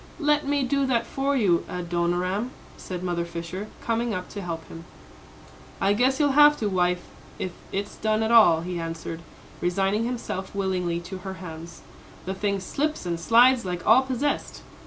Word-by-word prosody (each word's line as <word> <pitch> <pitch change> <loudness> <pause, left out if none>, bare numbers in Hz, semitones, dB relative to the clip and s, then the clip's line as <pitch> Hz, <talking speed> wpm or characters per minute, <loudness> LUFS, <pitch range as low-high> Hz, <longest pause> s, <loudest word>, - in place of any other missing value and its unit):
"Let 295 -2 +2
me 285 -1 +1
do 275 +1 +1
that 235 -3 +1
for 275 +1 -1
you, 185 -8 +3
Adoniram," 180 +5 -1 0.3
said 180 -1 -6
Mother 175 -1 -1
Fisher, 170 +4 -6 0.2
coming 230 -1 0
up 180 0 -5
to 205 - -6
help 165 -3 -5
him. 165 - -10 1.0
"I 200 - +3
guess 255 +6 +2
you'll 290 -2 +3
have 295 +1 +7
to, 215 - -1
wife, 180 -1 +1 0.3
if 185 - -3 0.2
it's 200 +1 -4
done 215 0 +1
at 220 - 0
all," 195 -9 +7
he 175 0 -4
answered, 165 0 -5 0.4
resigning 195 +5 +1
himself 230 -6 -4
willingly 180 -3 -1
to 185 +2 -7
her 190 +1 -6
hands; 165 -2 -9 0.4
"the 190 - -2
thing 200 0 -1
slips 290 +8 -2
and 170 -1 -2
slides 240 +5 +5
like 180 -2 -4
all 230 +4 +7
possessed. 265 +2 -2
195 Hz, 170 wpm, -25 LUFS, 175-240 Hz, 1.0 s, have